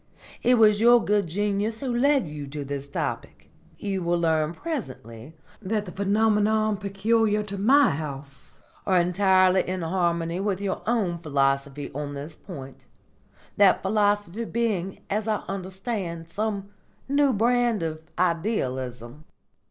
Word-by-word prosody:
It 250 +1 +4
was 215 -2 +5
your 240 0 +6
good 205 -2 +2
genius 205 +5 -1
who 255 -3 -2
led 275 +1 +3
you 150 -1 -7
to 145 0 -6
this 140 0 -5
topic. - - -5 0.3
You 195 -2 -3
will 175 0 +1
learn 160 -1 +1
presently 135 - -6 0.3
that 210 +1 -2
the 180 - -8
phenomena 215 +2 +2
peculiar 210 +2 +1
to 200 -1 -5
my 270 +7 +5
house 140 -2 -7 0.2
are 185 -2 +4
entirely 185 +1 +4
in 185 -1 -2
harmony 170 0 0
with 195 -1 -1
your 200 -1 -3
own 200 -8 0
philosophy 140 -2 -1
on 145 0 -5
this 145 +3 -7
point, 135 -8 -10 0.7
that 200 -2 +5
philosophy 205 0 +1
being, 210 -6 -2
as 210 +2 -2
I 215 -1 -1
understand, 190 -3 -5
some 200 +1 -3 0.4
new 280 0 +3
brand 235 -2 +2
of 155 -1 -4 0.2
Idealism." 135 - -2
190 Hz, 135 wpm, -25 LUFS, 160-215 Hz, 0.7 s, your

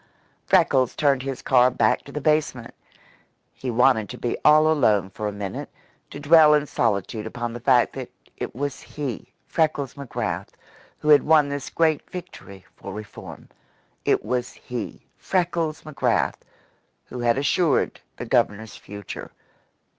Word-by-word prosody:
Freckles 130 -2 +3
turned 140 -3 +2
his 135 -1 -5
car 125 -1 +5
back 125 - +1
to 140 - -11
the 150 - -4
basement. 145 -5 0 0.8
He 130 - -6
wanted 120 -2 +3
to 125 - -7
be 120 - -2
all 155 +1 +6
alone 105 - +2
for 105 +2 -4
a - - -2
minute, 100 -1 -6 0.4
to - - -8
dwell 150 +1 +6
in 150 0 +1
solitude 110 -3 -1
upon 120 +1 -5
the 120 - -6
fact 125 0 +3
that - - -6 0.3
it - - -6
was 140 +1 -4
he, 140 -6 -6
Freckles 150 -5 0
McGrath, 140 -3 -4 0.5
who 150 - -3
had 145 -1 +8
won 150 -2 +4
this 140 -1 -4
great 160 -3 +1
victory 100 - -10
for 100 - -9
reform. 105 +1 -10 0.6
It - - +1
was 125 -1 -2
he, 120 -3 -7
Freckles 170 -4 -1
McGrath, 155 -2 0 0.7
who 125 - -8
had 120 +1 +2
assured 145 +2 +1 0.2
the - - -5
Governor's 105 +1 0
future. 100 -1 -9
130 Hz, 145 wpm, -24 LUFS, 115-150 Hz, 0.8 s, had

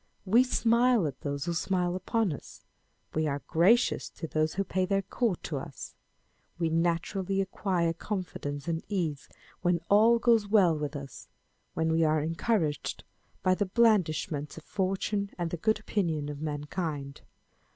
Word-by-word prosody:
We 225 +6 +5
smile 235 -3 +3
at 135 -3 -5
those 140 -1 -3
who 170 - -1
smile 180 0 0
upon 195 0 0
us: - - -11 0.5
we 155 0 +1
are 140 -1 -2
gracious 195 +9 +3
to 165 - -7
those 155 0 0
who 195 - +1
pay 185 0 -1
their 195 +1 +1
court 200 -1 -1
to 150 - -3
us: 135 -1 -8 0.6
we 165 -2 0
naturally 175 +4 0
acquire 185 -3 0
confidence 170 -6 -5
and 165 -1 -1
ease 165 -8 -2 0.3
when 175 -1 +2
all 220 +3 +6
goes 230 -3 +3
well 195 -6 +4
with 150 0 -4
us, 140 -1 -8 0.5
when 160 0 +1
we 165 0 +3
are 155 0 +3
encouraged 165 -1 -1 0.4
by 185 - +4
the 205 +1 0
blandishments 180 -9 +1
of 160 - -9
fortune 195 +2 -1
and 170 -2 -2
the 175 - -2
good 220 +5 +1
opinion 165 -9 -1
of 145 0 -6
mankind. 145 -1 -4
175 Hz, 155 wpm, -29 LUFS, 155-200 Hz, 0.6 s, all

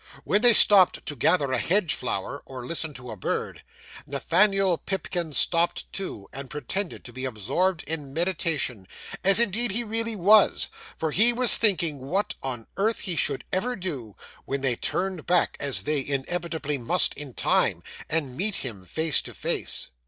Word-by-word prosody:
When 205 - +1
they 240 -1 +6
stopped 200 -3 +6
to 145 - -5
gather 140 +2 +1
a 130 - +1
hedge 180 - +1
flower, 125 +3 -4
or 130 -2 -8
listen 160 +2 -2
to 125 -1 -9
a - - -6
bird, 95 - -4 0.5
Nathaniel 185 +5 +2
Pipkin 180 -4 -3
stopped 170 +5 +1
too, 145 - -6
and 135 -1 -7
pretended 160 - -4
to 120 - -10
be 130 +2 -7
absorbed 135 - -1
in 150 -4 -4
meditation, 155 - -1 0.4
as 195 +1 +6
indeed 235 +1 +3
he 225 +5 -1
really 225 0 -1
was; 205 +2 +4 0.3
for 160 -1 -2
he 220 +10 +6
was 245 0 +4
thinking 170 -9 +2
what 180 +11 -2
on 125 -4 -5
earth 220 +3 0
he 180 -4 -2
should 140 -4 -1
ever 240 +7 -1
do, 140 - -6 0.3
when 140 0 -3
they 130 -3 +1
turned 185 +4 -3
back, 180 0 +2
as 130 -9 -1
they 150 +1 -1
inevitably 150 +1 -3
must 170 +10 +3
in 140 -4 -9
time, - - +1 0.3
and 145 -5 -1
meet 200 +7 0
him 100 -7 -6
face 160 - +2
to - - -8
face. - - -2
165 Hz, 165 wpm, -25 LUFS, 135-195 Hz, 0.5 s, they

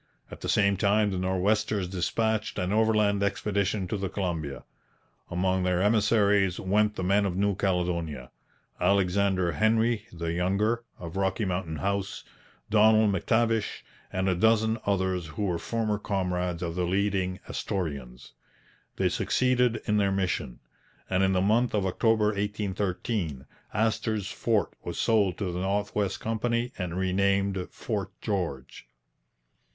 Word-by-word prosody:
At - - -10
the - - -4
same 100 -1 +3
time 105 +1 +2
the 95 - -2
Nor'westers 95 +1 0
dispatched 110 +4 -1
an 90 +2 -1
overland 105 -2 +3
expedition 100 -1 0
to 105 - -1
the 95 -1 -3
Columbia. 85 -8 -3 0.7
Among 95 +1 0
their 90 -1 +1
emissaries 105 -3 +3
went 105 +2 +1
the 95 - -3
men 100 +3 +3
of 95 -3 -1
New 100 0 +1
Caledonia, 85 -8 -1 0.5
Alexander 95 -2 +2
Henry 110 +1 +1
(the 85 -1 -3
younger) 100 +7 +1
of 85 +1 -7
Rocky 95 +2 0
Mountain 90 -3 -2
House, 100 +3 -2 0.5
Donald 110 0 +5
M'Tavish, 110 +3 0 0.3
and 95 +1 -1
a 95 - +3
dozen 110 +3 +2
others 95 -3 0
who 90 +7 -5
were 85 -3 -1
former 110 -3 -1
comrades 90 -3 -2
of 85 -1 -2
the 90 0 -1
leading 95 -1 0
Astorians. 70 -9 -4 0.6
They - - +1
succeeded 125 -2 +1
in 105 -1 +1
their 100 -1 +2
mission, 95 -10 -2 0.5
and 95 0 +2
in 95 0 +3
the 90 - +2
month 110 +4 +2
of 100 -2 +1
October 110 +3 +2
1813 100 - -2 0.3
Astor's 110 -2 0
fort 110 -3 0
was - - -5
sold 100 -6 +2
to 95 -4 -2
the 90 - -3
North 100 +2 -1
West 100 -2 -1
Company 120 +2 -1
and 90 -2 -4
renamed 95 0 +1
Fort - - -4
George. 85 -10 -4
100 Hz, 140 wpm, -27 LUFS, 90-105 Hz, 0.7 s, Donald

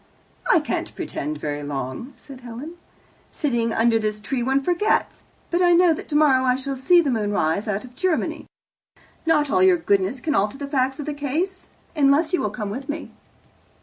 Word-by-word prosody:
"I - - +6
can't - - -4
pretend 150 +2 -4
very 145 0 -4
long," 145 - -5
said 270 -2 -13
Helen. 245 +7 -8 0.6
"Sitting 240 -6 -1
under 225 0 +3
this 215 -1 -2
tree 245 +4 -3
one 265 +3 +1
forgets, 355 +7 0 0.3
but 345 +1 +1
I 350 -1 +5
know 345 -1 +5
that - - -7
tomorrow 295 -4 +4
I 250 -1 +3
shall 270 +1 -4
see 345 +7 +4
the 285 -5 0
moon 210 -3 -1
rise 195 +2 0
out 210 +2 -2
of 250 0 -15
Germany. 370 0 -1 0.8
Not 300 -3 +3
all - - +3
your 375 -1 +6
goodness 200 - 0
can 300 +4 -1
alter 205 +3 0
the 285 - -5
facts 265 0 0
of 295 - -4
the 300 - -3
case. 310 +7 -3 0.3
Unless 295 +3 +3
you 360 - +2
will 210 - 0
come 210 -1 -5
with 265 +6 -6
me." 305 +2 -5
265 Hz, 190 wpm, -23 LUFS, 215-310 Hz, 0.8 s, I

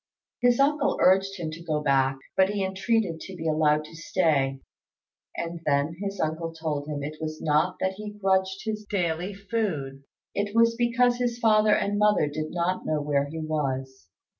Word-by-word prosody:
His 245 0 +4
uncle 285 0 +2
urged 195 +1 +3
him 165 -3 -4
to 165 +2 -9
go 155 -3 -1
back, 135 -2 +2 0.2
but 190 0 +4
he 205 -2 -1
entreated 190 -2 0
to 190 - -8
be 165 -2 -4
allowed 155 -1 +2
to 165 - -13
stay; 150 -6 +1 0.8
and 170 0 -4
then 145 +1 +1
his 200 -1 -4
uncle 160 +1 -2
told 150 -3 -3
him 145 -2 -4
it 150 +2 -5
was 155 0 -4
not 155 +4 +1
that 190 0 0
he 210 0 -6
grudged 190 -2 0
his 215 -1 -3
daily 180 0 -1
food: 185 -10 -3 0.3
it 205 +1 -2
was 230 0 +5
because 240 +1 +2
his 245 -1 -1
father 215 -2 +4
and 205 0 0
mother 210 -6 +4
did 155 +1 -4
not 175 +1 -1
know 155 -1 0
where 145 -1 0
he 160 +3 -7
was. 135 -6 -3
170 Hz, 180 wpm, -26 LUFS, 150-205 Hz, 0.8 s, was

